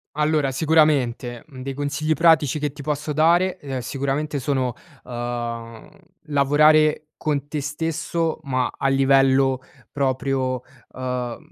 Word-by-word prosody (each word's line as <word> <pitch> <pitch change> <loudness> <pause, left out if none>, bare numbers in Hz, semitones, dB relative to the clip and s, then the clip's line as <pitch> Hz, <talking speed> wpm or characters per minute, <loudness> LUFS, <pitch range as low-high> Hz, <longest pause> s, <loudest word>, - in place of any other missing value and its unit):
Allora, 150 -2 +1
sicuramente, 135 -5 +1
mhmm, 130 -4 -11
dei 135 +1 -4
consigli 145 +2 -1
pratici 160 -2 +4
che 150 -1 -2
ti 145 - -10
posso 150 +1 -2
dare, 175 +4 +3
uhm, 135 -2 -4
sicuramente, 140 +4 -2
sono, 130 -1 -1 0.3
uhm, 120 -1 -5 0.4
lavorare 150 +2 +4
con 145 -2 -2
te 150 0 -3
stesso, 160 +2 -2
ma 130 -3 -1
a 135 - -1
livello 135 -1 +3 0.3
proprio 130 -2 -1 0.3
uhm, 125 -2 -3
140 Hz, 120 wpm, -22 LUFS, 130-155 Hz, 0.4 s, pratici